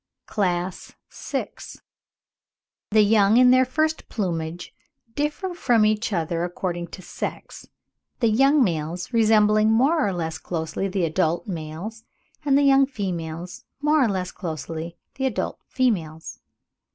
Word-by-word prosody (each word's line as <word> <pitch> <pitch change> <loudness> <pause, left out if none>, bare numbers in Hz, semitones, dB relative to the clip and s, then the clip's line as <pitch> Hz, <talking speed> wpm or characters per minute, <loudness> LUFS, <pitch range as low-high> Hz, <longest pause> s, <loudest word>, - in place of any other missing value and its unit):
CLASS 180 -2 -2 0.2
VI. - - -4 0.7
— - - -69
THE 215 0 +5
YOUNG 210 +1 +4
IN 250 0 +7
THEIR 255 0 +5
FIRST 310 +4 -1
PLUMAGE 170 -4 -3 0.4
DIFFER 295 +7 -2
FROM 240 -10 +3
EACH 215 +2 +1
OTHER 170 -2 -1
ACCORDING 175 -1 -3
TO 185 +2 -11
SEX; - - -6 0.5
THE 230 - +3
YOUNG 275 +6 +4
MALES 170 +2 -3
RESEMBLING 215 -1 +4
MORE 270 +5 +3
OR 195 - -1
LESS 160 -2 -3
CLOSELY 165 +3 -3
THE 185 -2 0
ADULT 165 +3 0
MALES, 180 +6 -6 0.4
AND 280 -1 +3
THE 285 - +3
YOUNG 275 -1 +5
FEMALES 175 - -5 0.2
MORE 300 -2 +4
OR - - +1
LESS 185 -2 -2
CLOSELY 165 0 -6 0.2
THE 265 0 +1
ADULT 255 - -3
FEMALES. 170 -12 -1
200 Hz, 135 wpm, -24 LUFS, 170-250 Hz, 0.7 s, IN